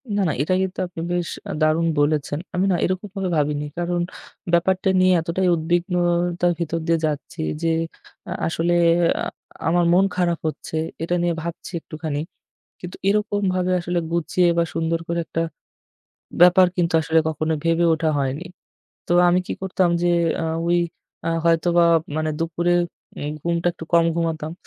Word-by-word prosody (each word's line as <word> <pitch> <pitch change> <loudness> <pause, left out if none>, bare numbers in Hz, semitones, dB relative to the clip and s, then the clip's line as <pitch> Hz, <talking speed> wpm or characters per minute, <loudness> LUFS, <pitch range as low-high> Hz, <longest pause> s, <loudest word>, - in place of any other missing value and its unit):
না, 205 - +2
না, - - 0
এটা 155 - +1
কিন্তু 190 0 -3
আপনি 170 -2 -8
বেশ 175 -1 -1 0.2
আ - - -2
দারুণ 155 +2 +3
বলেছেন। 145 0 +1 0.2
আমি 185 - +2
না - - +3
এরকমভাবে 190 0 -3
ভাবিনি। 150 0 0
কারণ 175 0 -1 0.5
ব্যাপারটা 185 +2 +2
নিয়ে 185 0 +5
এতটাই 175 +3 -1
উদ্বিগ্নতার 175 +1 +1
ভিতর 165 0 -2
দিয়ে 165 0 +3
যাচ্ছি 155 +2 -4 0.2
যে 165 - 0 0.6
আ - - -5 0.2
আসলে 170 +1 0 0.5
আ - - -1 0.4
আমার 175 +1 +3
মন 190 +2 +5
খারাপ 175 -2 +1
হচ্ছে 155 - -5 0.3
এটা 175 +2 0
নিয়ে 175 0 +1
ভাবছি 170 +2 -6
একটুখানি। 155 -2 -5 0.6
কিন্তু 180 0 -8
এরকমভাবে 200 -3 0
আসলে 175 0 -1
গুছিয়ে 170 +1 +2
বা 170 - +4
সুন্দর 165 0 0
করে 170 0 -1
একটা 165 - -2 1.0
ব্যাপার 180 +1 +7
কিন্তু 170 -2 0
আসলে 160 +1 +2
কখনো 155 0 -1
ভেবে 165 +1 +2
ওঠা 160 0 -1
হয়নি। 140 +5 -2 0.6
তো - - +1 0.2
আমি 175 +1 +4
কি - - -3
করতাম? 185 -1 +1
যে 175 - +2 0.4
আ - - -1 0.2
ওই 175 - +3 0.5
আ 165 - +1
হয়তোবা 170 +1 +3 0.3
মানে 155 0 0
দুপুরে 170 +1 0 0.5
উম 145 - -3
ঘুমটা 170 0 -1
একটু 160 - -8
কম 170 0 +6
ঘুমাতাম। 160 -2 -2
170 Hz, 155 wpm, -22 LUFS, 160-180 Hz, 1.0 s, ব্যাপার